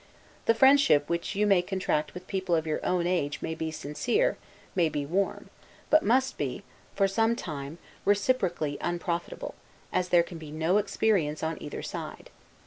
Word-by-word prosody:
The 230 Hz, -, +5 dB
friendship 265 Hz, -, +5 dB
which 170 Hz, +2 st, -2 dB
you 210 Hz, +1 st, +2 dB
may 195 Hz, -3 st, +5 dB
contract 180 Hz, -5 st, -1 dB
with 180 Hz, -, -8 dB
people 190 Hz, -3 st, 0 dB
of 160 Hz, -1 st, 0 dB
your 155 Hz, -1 st, -2 dB
own 180 Hz, -1 st, +1 dB
age 150 Hz, -5 st, 0 dB
may 160 Hz, -, -3 dB
be 160 Hz, 0 st, -3 dB
sincere, 235 Hz, -, 0 dB, 0.4 s
may 170 Hz, -4 st, +2 dB
be 145 Hz, -2 st, -3 dB
warm; 190 Hz, +6 st, -1 dB, 0.4 s
but 310 Hz, -, +7 dB
must 260 Hz, +3 st, +1 dB
be, -, -, -3 dB, 0.3 s
for 195 Hz, -, +3 dB
some 225 Hz, +4 st, +2 dB
time, 145 Hz, -5 st, -6 dB, 0.3 s
reciprocally 195 Hz, -, +1 dB
unprofitable, 175 Hz, 0 st, -3 dB, 0.4 s
as 180 Hz, 0 st, 0 dB
there 175 Hz, -1 st, +5 dB
can 170 Hz, -1 st, -9 dB
be 155 Hz, -2 st, -9 dB
no 160 Hz, +6 st, +2 dB
experience 190 Hz, -8 st, 0 dB
on 160 Hz, 0 st, -2 dB
either 145 Hz, -, -6 dB
side. -, -, -7 dB
175 Hz, 165 wpm, -28 LUFS, 160-205 Hz, 0.4 s, but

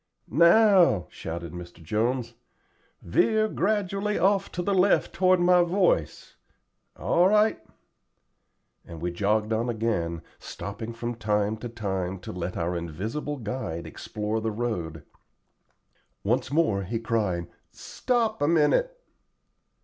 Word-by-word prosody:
"Now," 170 Hz, -, +5 dB
shouted 85 Hz, 0 st, -6 dB
Mr. 90 Hz, 0 st, -9 dB
Jones, 120 Hz, +7 st, -1 dB, 0.7 s
"veer 215 Hz, -, +2 dB
gradually 205 Hz, 0 st, -1 dB
off 195 Hz, +2 st, +2 dB
to 175 Hz, -, -2 dB
the 200 Hz, -, 0 dB
left 190 Hz, +1 st, +3 dB
toward 185 Hz, -1 st, +3 dB
my 180 Hz, 0 st, +5 dB
voice 175 Hz, -, 0 dB, 0.6 s
all 175 Hz, +2 st, +3 dB
right;" 210 Hz, -, +3 dB, 1.2 s
and 85 Hz, -2 st, -10 dB
we 85 Hz, +2 st, -2 dB
jogged 105 Hz, +4 st, 0 dB
on 115 Hz, +2 st, 0 dB
again, 95 Hz, -8 st, -2 dB, 0.2 s
stopping 105 Hz, +3 st, -7 dB
from 120 Hz, +1 st, -4 dB
time 105 Hz, -2 st, 0 dB
to 120 Hz, +2 st, -6 dB
time 95 Hz, -5 st, -3 dB
to -, -, -7 dB
let 90 Hz, 0 st, -4 dB
our 85 Hz, +2 st, -1 dB
invisible 105 Hz, -, -4 dB
guide 105 Hz, -8 st, -4 dB
explore 105 Hz, +1 st, -4 dB
the 110 Hz, -, -1 dB
road. 105 Hz, -9 st, -3 dB, 1.2 s
Once -, -, 0 dB
more 145 Hz, -11 st, +2 dB
he 110 Hz, +5 st, -3 dB
cried, 105 Hz, -7 st, -1 dB, 0.2 s
"Stop 235 Hz, -4 st, -2 dB
a 145 Hz, -, +3 dB
minute." 170 Hz, -, +2 dB
115 Hz, 120 wpm, -26 LUFS, -, 1.2 s, Now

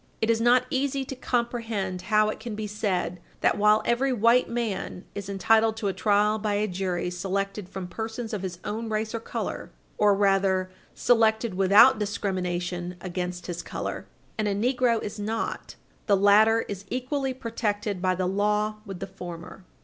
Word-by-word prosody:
It 225 Hz, +1 st, +2 dB
is 225 Hz, 0 st, +1 dB
not 245 Hz, +2 st, +4 dB
easy 270 Hz, 0 st, 0 dB
to 270 Hz, -, -6 dB
comprehend 230 Hz, -7 st, -2 dB
how 215 Hz, 0 st, +4 dB
it -, -, -4 dB
can 225 Hz, -1 st, -6 dB
be 215 Hz, 0 st, -4 dB
said 200 Hz, -4 st, -2 dB, 0.2 s
that, -, -, +3 dB
while 210 Hz, +1 st, +4 dB
every 260 Hz, +3 st, +2 dB
white 235 Hz, +1 st, +3 dB
man 225 Hz, -5 st, -3 dB
is 200 Hz, -1 st, -6 dB
entitled 220 Hz, +3 st, +3 dB
to 205 Hz, -3 st, -1 dB
a -, -, -2 dB
trial 210 Hz, +3 st, +2 dB
by 210 Hz, -1 st, -1 dB
a 210 Hz, +1 st, +1 dB
jury 180 Hz, -2 st, -2 dB
selected 195 Hz, +1 st, -3 dB
from 190 Hz, -1 st, -6 dB
persons 225 Hz, +4 st, -5 dB
of 205 Hz, -, -2 dB
his 185 Hz, -2 st, -5 dB
own 225 Hz, +2 st, -4 dB
race 215 Hz, 0 st, -2 dB
or 230 Hz, -, -2 dB
color, -, -, -5 dB, 0.3 s
or, 205 Hz, -1 st, +5 dB
rather, 195 Hz, -2 st, +2 dB, 0.2 s
selected 225 Hz, -2 st, +3 dB
without 200 Hz, +6 st, +6 dB
discrimination 180 Hz, -4 st, -2 dB
against 180 Hz, 0 st, -4 dB
his 175 Hz, -1 st, -4 dB
color, -, -, -5 dB, 0.3 s
and 215 Hz, -, +1 dB
a 200 Hz, -, 0 dB
negro 245 Hz, +1 st, +2 dB
is 210 Hz, +1 st, -6 dB
not, 220 Hz, +2 st, -3 dB, 0.3 s
the 200 Hz, -2 st, +4 dB
latter 215 Hz, +3 st, +5 dB
is 200 Hz, -2 st, -7 dB
equally 265 Hz, +2 st, -2 dB
protected 215 Hz, -5 st, -3 dB
by 185 Hz, 0 st, +2 dB
the 185 Hz, 0 st, -1 dB
law 210 Hz, +3 st, 0 dB
with 195 Hz, -2 st, -7 dB
the -, -, -2 dB
former. 180 Hz, 0 st, -9 dB
210 Hz, 170 wpm, -26 LUFS, 190-225 Hz, 0.3 s, without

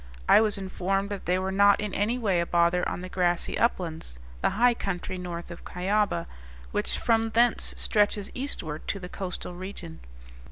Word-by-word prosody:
I -, -, +7 dB
was 215 Hz, -2 st, +2 dB
informed 195 Hz, +1 st, -2 dB
that 200 Hz, -, -5 dB
they 180 Hz, +1 st, +3 dB
were 190 Hz, +1 st, -2 dB
not 200 Hz, +1 st, +5 dB
in 210 Hz, -2 st, -3 dB
any 220 Hz, +5 st, +1 dB
way 200 Hz, -7 st, +1 dB
a 170 Hz, -, -2 dB
bother 170 Hz, +1 st, +2 dB
on -, -, -4 dB
the 185 Hz, -, -6 dB
grassy 175 Hz, -2 st, 0 dB
uplands, 165 Hz, -, -1 dB, 0.2 s
the -, -, +3 dB
high 245 Hz, +1 st, +5 dB
country 185 Hz, -4 st, -4 dB
north 175 Hz, -1 st, -6 dB
of 170 Hz, -, -9 dB
Cuyaba, 190 Hz, -1 st, 0 dB, 0.5 s
which -, -, -1 dB
from 225 Hz, -1 st, +2 dB
thence 235 Hz, +1 st, +3 dB
stretches 205 Hz, -1 st, +1 dB
eastward 160 Hz, -, -4 dB
to 200 Hz, -, -2 dB
the 180 Hz, -1 st, -8 dB
coastal 180 Hz, -1 st, -5 dB
region. 180 Hz, -2 st, -8 dB
190 Hz, 175 wpm, -27 LUFS, 175-210 Hz, 0.5 s, I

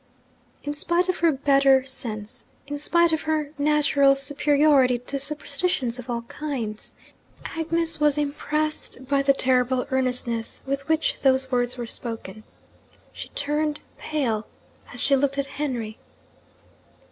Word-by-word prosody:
In 290 Hz, -, -3 dB
spite 345 Hz, +4 st, 0 dB
of 370 Hz, -, 0 dB
her 335 Hz, -1 st, +4 dB
better 275 Hz, -1 st, +4 dB
sense, 235 Hz, -3 st, -6 dB, 0.2 s
in 290 Hz, 0 st, -5 dB
spite 340 Hz, +3 st, +3 dB
of 320 Hz, -, 0 dB
her 305 Hz, -2 st, 0 dB
natural 285 Hz, -2 st, +4 dB
superiority 280 Hz, -2 st, +3 dB
to 260 Hz, +3 st, -4 dB
superstitions 280 Hz, -3 st, 0 dB
of 250 Hz, 0 st, -9 dB
all 235 Hz, -1 st, -2 dB
kinds, 235 Hz, -5 st, -5 dB, 0.6 s
Agnes 330 Hz, 0 st, -1 dB
was 300 Hz, -1 st, +3 dB
impressed 300 Hz, -2 st, -2 dB
by 280 Hz, 0 st, +2 dB
the 275 Hz, 0 st, +4 dB
terrible 255 Hz, -1 st, +2 dB
earnestness 250 Hz, -3 st, 0 dB
with 275 Hz, 0 st, -3 dB
which 320 Hz, 0 st, +1 dB
those 265 Hz, -1 st, +2 dB
words 245 Hz, 0 st, +1 dB
were 240 Hz, -, -4 dB
spoken. 225 Hz, -3 st, -6 dB, 0.7 s
She -, -, -8 dB
turned 295 Hz, +1 st, 0 dB, 0.2 s
pale 235 Hz, -9 st, -2 dB, 0.4 s
as -, -, -7 dB
she 275 Hz, -, +3 dB
looked 275 Hz, 0 st, 0 dB
at 280 Hz, -, 0 dB
Henry. 255 Hz, -6 st, -4 dB
275 Hz, 135 wpm, -24 LUFS, 250-300 Hz, 0.7 s, her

